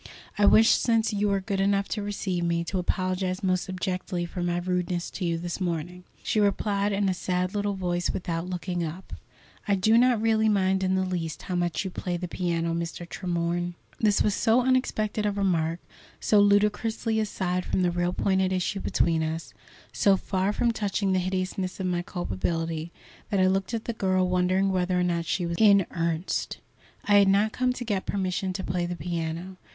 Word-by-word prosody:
"I 205 -1 +4
wish, 225 +2 +6
since 230 -2 +2
you 205 0 +1
are 200 0 +2
good 195 0 -2
enough 200 0 +2
to 215 - -2
receive 195 -3 -2
me, 170 0 0
to 185 +3 -2
apologize 185 +1 -1
most 185 0 0
abjectly 185 -1 -3
for 175 +1 -6
my 175 0 0
rudeness 180 0 -2
to 195 - -5
you 170 -1 0
this 175 +3 -5
morning." 175 +1 -3 0.2
She 215 - 0
replied 200 0 +1
in 200 0 +1
a 190 - +2
sad 180 0 -1
little 205 -1 -1
voice, 175 -2 -1
without 170 -1 -3
looking 175 -1 -3
up: 165 +4 -7 0.5
"I 200 - +3
do 220 +5 +4
not 245 -2 +4
really 220 0 +2
mind 190 -2 +2
in 190 0 +1
the 190 0 +1
least 170 -3 -4
how 185 - -5
much 175 +2 -1
you 190 - -3
play 175 0 -3
the 180 +1 -4
piano, 170 -1 -1
Mr. 170 +1 -4
Tremorne." 175 -1 -2 0.2
This 210 -2 +3
was 210 - +2
so 230 +4 +3
unexpected 220 -5 0
a - - +1
remark, 175 -5 0 0.4
so 210 - +3
ludicrously 210 +2 +2
aside 185 -4 -1
from 185 - 0
the 175 - +2
real 175 0 0
point 190 +1 +1
at 190 0 +1
issue 185 +1 -1
between 165 -3 +1
us, 160 +1 -4 0.4
so 195 -1 +4
far 190 +1 -1
from 235 +2 +1
touching 205 -2 -1
the 185 - +2
hideousness 185 0 -2
of 190 - -2
my 175 -1 0
culpability, 165 - -3 0.4
that 200 -3 +1
I 185 - +5
looked 190 +3 +1
at 225 - -4
the 235 - -2
girl, 185 -3 +1
wondering 185 +2 +2
whether 180 -1 +1
or - - +2
not 170 -1 0
she 180 0 0
was 170 0 -3
in 200 -4 +6
earnest. 165 0 -2 0.5
I 205 -1 +5
had 200 - +5
not 200 +3 +3
come 255 +2 0
to 245 -1 -6
get 205 -4 -2
permission 190 -1 -1
to 190 - -4
play 175 0 -1
the 175 - -3
piano. 170 +2 -4
185 Hz, 200 wpm, -26 LUFS, 175-200 Hz, 0.5 s, wish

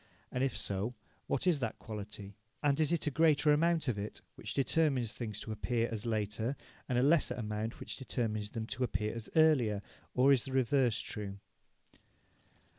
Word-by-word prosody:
And, 125 - 0
if 135 -3 0
so, 100 +5 -1 0.3
what 135 - 0
is 175 -5 +3
that 115 -4 -2
quality, 105 -2 -7 0.3
and 145 0 +3
is 155 -1 +3
it 170 - +1
a 150 - +1
greater 155 -1 +4
amount 165 +1 +2
of 115 -5 0
it 105 +1 -5
which - - -7
determines 135 -5 +2
things 110 -4 -4
to 110 - -5
appear 115 +2 0
as 110 0 -3
later, 110 +3 -1 0.3
and 125 - +1
a 125 - +4
lesser 150 +2 +4
amount 110 0 -3
which - - -5
determines 110 -5 -2
them 110 0 -4
to 130 +3 -2
appear 105 -3 -1
as 115 -1 -6
earlier, 130 -11 +4 0.3
or 135 +2 +6
is 130 - +2
the 135 - -5
reverse 130 -2 +3
true? 100 -2 -5
120 Hz, 180 wpm, -33 LUFS, 110-140 Hz, 0.3 s, or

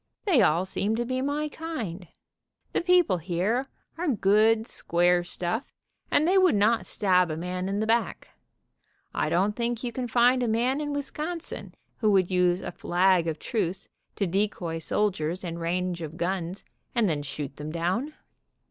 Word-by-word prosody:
They 345 - +4
all 170 +4 +3
seem 205 +3 -1
lo 240 +1 -1
be 255 +1 -2
my 290 +2 -1
kind. 235 - -6 0.7
The - - +1
people 350 - +4
here 190 - -1 0.3
are 355 - -1
good, 220 -2 +3
square 175 -3 +2
stuff, 180 +7 -3 0.4
and 310 - +3
they 380 +2 +5
would 370 - +4
not 215 +3 +2
stab 180 -4 +2
a 155 - -3
man 180 +2 -3
in 200 +1 -1
the 215 - 0
back. 230 +1 0 0.8
I - - 0
don't 195 +4 +1
think 235 0 -2
you 245 - -2
'can 250 0 -3
find 245 +2 +4
a 245 - +1
man 245 +6 +1
in 295 -1 -3
Wisconsin 305 +4 -5 0.2
who 215 - +2
would 190 -2 +3
use 180 0 +2
a - - -5
flag 175 0 +2
of 160 -1 -2
truce 195 -4 -3 0.3
to 200 - 0
decoy 180 -3 -1
soldiers 180 -2 -1
in 170 -1 -5
range 175 +1 -2
of 160 0 -6
guns, 180 +1 -3 0.3
and 235 -3 +3
then 155 -4 -1
shoot 145 0 -6
them 150 +1 -6
down. 185 - -2
200 Hz, 170 wpm, -27 LUFS, 175-245 Hz, 0.8 s, they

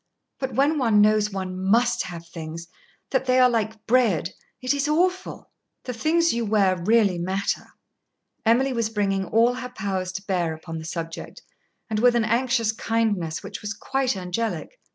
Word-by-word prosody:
But 265 -1 -3
when 290 +3 +3
one 225 -5 +3
knows 210 0 +4
one 185 -2 -5
must 235 +4 +3
have 170 -2 -8
things, 165 0 -7 0.4
that 265 -1 +1
they 255 0 +4
are 255 - +7
like 220 -1 -2
bread, 225 -9 +2 0.3
it 255 +2 0
is 285 0 0
awful!" 365 +5 -1 0.3
"The 250 - -4
things 330 +6 +2
you 235 0 -1
wear 200 -3 +3
really 205 -2 +3
matter." 190 +3 -2 0.8
Emily 255 +4 +3
was 230 -2 0
bringing 195 -3 0
all 230 +2 +3
her 250 0 -6
powers 190 -5 -3
to 190 +1 -5
bear 175 -5 0
upon 165 0 -7
the 160 - -8
subject, 165 0 -6 0.4
and 215 -1 -1
with 245 +1 +4
an 235 -2 +2
anxious 235 0 +1
kindness 215 -8 -1
which - - -7
was 210 +1 -4
quite 265 -1 -1
angelic. 185 +5 -3
220 Hz, 170 wpm, -24 LUFS, 190-250 Hz, 0.8 s, are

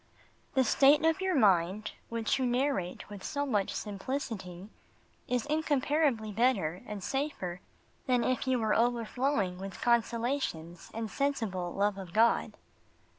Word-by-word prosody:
The 265 - +5
state 285 +5 +5
of 325 +3 +2
your 380 -2 +1
mind, 195 - +3 0.2
which 230 +2 0
you 260 - +1
narrate 245 -7 -1
with 205 -2 -9
so 285 -2 -2
much 210 -8 0
simplicity, 200 -4 -5 0.6
is 250 -2 0
incomparably 290 -6 +1
better 200 -7 +1
and 210 -2 -6
safer 270 -11 -3 0.5
than 250 -2 +3
if 255 +1 0
you 260 -1 +3
were 220 -2 +1
overflowing 235 -4 0
with 195 0 -7
consolations 235 - -1
and 225 0 -2
sensible 220 -11 -1
love 200 +1 0
of 185 -3 -9
God. 230 +2 +3
230 Hz, 130 wpm, -30 LUFS, 195-270 Hz, 0.6 s, The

